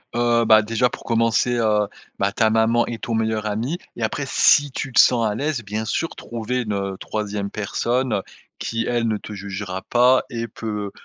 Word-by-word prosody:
Heu, 120 -1 +2
bah, 110 -1 +7
déjà, 115 +3 +1
pour - - -9
commencer, 115 +1 +1
heu, 105 -3 +2 0.3
bah, 100 +1 +1
ta 110 +1 +2
maman 115 +2 +3
et 120 - -4
ton 115 - -4
meilleur 110 -1 0
ami 115 +10 -2 0.2
et 120 - -3
après 125 +6 -1
si 145 +1 +4
tu 130 0 -5
te - - +4
sens 115 -3 +5
à 105 - -2
l'aise, 140 -2 -2
bien 105 +1 -3
sûr, 165 +9 -1
trouver 120 +2 -3
une, 105 -3 -3
heu, 100 -1 -2
3e 105 -2 -3
personne, 120 +4 -1
heu, 100 - 0 0.4
qui 115 0 -2
elle 120 -1 0
ne 110 -1 0
te 105 - -9
jugera 95 -1 -5
pas 125 +2 +4
et 115 0 -4
peut 105 -2 -5
115 Hz, 200 wpm, -22 LUFS, 105-120 Hz, 0.4 s, bah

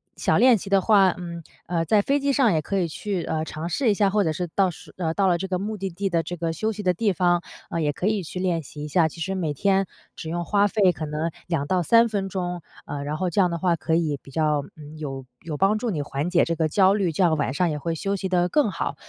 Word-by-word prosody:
小 - - +1
练 250 -2 +6
习 195 - -8
的 195 -1 +4
话， 195 -1 +5
嗯， 170 -2 -7 0.2
呃， 170 -1 0
在 215 +2 +4
飞 280 +1 +1
机 280 0 +1
上 255 -8 +3
也 155 - +1
可 195 +6 -2
以 180 -3 +1
去， 185 +2 -3
呃， 155 0 -2
尝 160 +1 -5
试 230 +8 +1
一 210 - +4
下， 200 -1 +3
或 210 -1 +2
者 160 - 0
是 175 +3 -3
到 195 -2 +3
时 170 - -12
呃， 165 -3 -1
到 200 - +2
了 175 -2 +2
这 190 - -3
个 185 - -1
目 210 +4 -3
的 195 -1 -4
地 190 +3 -3
的 170 -3 +1
这 175 +1 -6
个 165 0 -2
休 215 +7 -1
息 210 -1 -6
的 180 -1 +3
地 205 +3 +1
方， 175 0 +2 0.3
呃， 165 - -1
也 150 -1 +1
可 180 - -5
以 210 -1 +1
去 180 +1 -6
练 175 -3 0
习 145 +1 -9
一 - - -5
下。 160 +2 +3
其 165 +1 -10
实 190 +4 -2
每 165 -6 -2
天 195 +2 +2 0.3
只 160 - -7
用 175 +1 -2
花 205 +2 +3
费 200 -3 +3
可 155 -2 -5
能 155 +2 -2 0.2
2 165 -5 -1
到 180 +3 +1
3 230 +7 +5
分 195 -2 -2
钟， 180 -2 -3 0.2
呃， 140 -1 -5
然 150 +2 -3
后 185 0 -1
这 200 - +3
样 180 - +3
的 170 - -2
话 175 0 +1
可 160 0 -1
以 155 -4 0
比 - - -15
较， 150 -1 +1
嗯， 155 0 -11
有 135 -3 -5 0.2
有 155 -2 -5
帮 200 +4 +2
助 240 - -2
你 155 -8 -2
缓 145 +4 -3
解 180 - +3
这 170 - -1
个 160 -1 +1
焦 190 +4 +4
虑， 195 -5 +1
这 180 - +1
样 160 -2 +4
晚 145 -3 -1
上 175 +4 +1
也 150 - -3
会 165 +2 -2
休 195 +5 -2
息 190 -1 -3
得 180 -1 +2
更 295 -7 +2
好。 - - -3
175 Hz, 305 characters per minute, -24 LUFS, 160-195 Hz, 0.3 s, 练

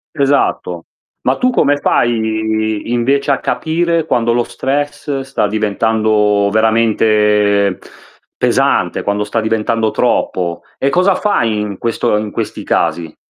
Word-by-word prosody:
Esatto. 135 - 0 0.4
Ma 130 - 0
tu 255 - +2
come 145 - +2
fai 110 -3 0
invece 135 +4 +1
a 135 - +1
capire 165 0 -1
quando 120 -5 +1
lo 120 0 +1
stress 145 +1 -3
sta 135 -5 -1
diventando 105 -1 +1
veramente 105 -2 +2 0.6
pesante, - - +1
quando 100 0 -1
sta 110 +2 -2
diventando 110 0 0
troppo. 85 -4 -1 0.2
E 135 - +1
cosa 185 +5 +2
fai 115 - 0
in 105 -2 -4
questo 115 -2 0
in 105 0 -3
questi - - -5
casi? 80 -2 -1
110 Hz, 120 wpm, -15 LUFS, 105-135 Hz, 0.6 s, tu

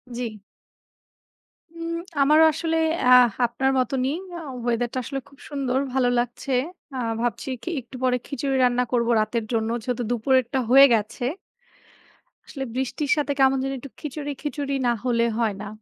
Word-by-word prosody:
জি। 230 -4 -5 1.4
উম 335 0 -4 0.3
আমারও 305 +3 +6
আসলে 325 +2 -1 0.3
অ্যা 250 - +6 0.3
আপনার 265 +3 0
মতনই। 255 +2 0 0.2
আ - - -6 0.2
ওয়েদারটা 240 +1 -1
আসলে 275 +3 -4
খুব 275 - -20
সুন্দর, 270 -3 -1
ভালো 260 -2 +2
লাগছে। 245 +3 -3 0.4
আ - - -3 0.2
ভাবছি 240 +2 -2
কি? - - -4
একটু 245 +2 -14
পরে 250 -1 +3
খিচুড়ি 280 -1 -2
রান্না 250 0 +3
করবো 240 -1 +2
রাতের 215 +1 -2
জন্য, 225 -1 0
যেহেতু 245 0 -2
দুপুরেরটা 255 +2 +1
হয়ে 270 +2 +9
গেছে। 215 +2 -1 1.2
আসলে 270 - -5
বৃষ্টির 265 +3 -2
সাথে 295 -2 -1
কেমন 270 0 +5
জানি 270 0 -2
একটু 275 - -10
খিচুড়ি, 290 0 -5
খিচুড়ি 285 -1 -3
না - - +4
হলে 235 -2 +2
হয় 225 -4 0
না। 210 - -6
255 Hz, 150 wpm, -24 LUFS, 240-275 Hz, 1.4 s, হয়ে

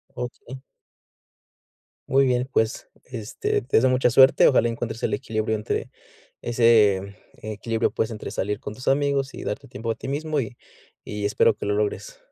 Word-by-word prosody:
Okey. 125 +1 -7 1.5
Muy 135 +1 +4
bien, 125 0 0
pues, 110 -1 -1 0.2
este, 115 -4 -3
te 130 - +1
deseo 130 +3 +4
mucha 125 -1 +3
suerte, 130 +2 +6
ojalá 120 -3 +4
encuentres 115 -1 -4
el 110 - 0
equilibrio, 110 +1 -1
entre, 105 - -3 0.5
ese 105 -5 +3 0.3
equilibrio, 110 +1 -2
pues, 110 - -1
entre 105 - -6
salir 105 +2 -2
con 105 - -7
tus 125 - -11
amigos 140 -1 +1
y - - -8
darte 105 - -5
tiempo 115 +1 -4
a - - -3
ti - - -9
mismo 150 +2 -1
y 120 -1 -5 0.5
y 105 -1 -5
espero 105 +1 +3
que - - -5
lo 105 - 0
logres. 105 - -2
115 Hz, 165 wpm, -24 LUFS, 110-130 Hz, 1.5 s, suerte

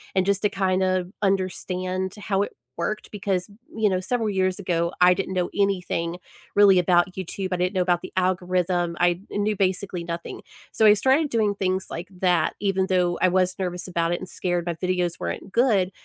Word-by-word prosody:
and 190 -1 +3
just 200 0 +1
to 210 - +3
kind 190 -1 0
of 185 -1 0
understand 185 -1 -1
how 200 -1 -1
it - - -6 0.2
worked 210 +6 -3
because, 195 -3 -2 0.3
you 220 -1 +2
know, 185 -2 +1
several 225 +3 -1
years 185 -2 0
ago 170 -3 0
I 180 0 +7
didn't 190 0 -3
know 180 -1 0
anything 180 -3 0 0.4
really 200 -2 +7
about 180 +1 +3
YouTube, 190 +1 -4
I - - 0
didn't 180 +2 0
know 185 - +2
about 175 -1 +1
the - - -8
algorithm, 180 -1 0
I 175 0 +2
kn 205 - -1
knew 210 +1 0
basically 185 -2 -1
nothing. 170 0 -6 0.3
So 220 - +2
I 210 - +9
started 270 +7 +2
doing 215 -4 +1
things 190 -1 -1
like 170 +2 -5
that 180 -2 +2
even 195 -2 0
though 180 -2 +1
I 185 - +5
was 185 0 +1
nervous 180 -1 -3
about 170 -2 0
it 175 - -1
and 185 - -8
scared 175 -1 -2
my 170 - -1
videos 180 -1 -1
weren't 85 - -5
good, 210 -7 +2
185 Hz, 200 wpm, -24 LUFS, 180-195 Hz, 0.4 s, I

